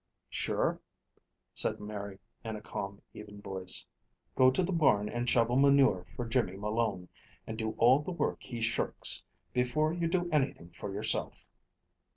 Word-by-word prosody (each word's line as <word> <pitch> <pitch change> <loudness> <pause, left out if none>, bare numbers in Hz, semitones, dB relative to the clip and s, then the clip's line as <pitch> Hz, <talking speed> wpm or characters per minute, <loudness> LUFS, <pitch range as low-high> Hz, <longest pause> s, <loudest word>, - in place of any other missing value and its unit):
"Sure!" - - 0 0.7
said - - -1
Mary, 100 -2 -6 0.3
in 110 -1 -4
a 105 - -7
calm, 100 -1 -6
even 105 -1 -10
voice. 95 -2 -1 0.5
"Go 130 0 +6
to 130 +8 +1
the 185 - -1
barn, 135 - +3
and 120 +2 -2
shovel 120 +1 +3
manure 135 -10 +4
for 120 - -3
Jimmy 115 -5 0
Malone, 105 -3 -1 0.4
and 110 - -5
do 110 -1 -3
all 125 +4 +6
the 150 - -6
work 170 - -1
he 120 -2 -6
shirks, 115 0 +2 0.3
before 140 +6 +1
you 170 -1 -1
do 175 +1 0
anything 135 - 0
for 95 +3 -7
yoursilf." 100 +2 +1
115 Hz, 155 wpm, -31 LUFS, 100-135 Hz, 0.7 s, Go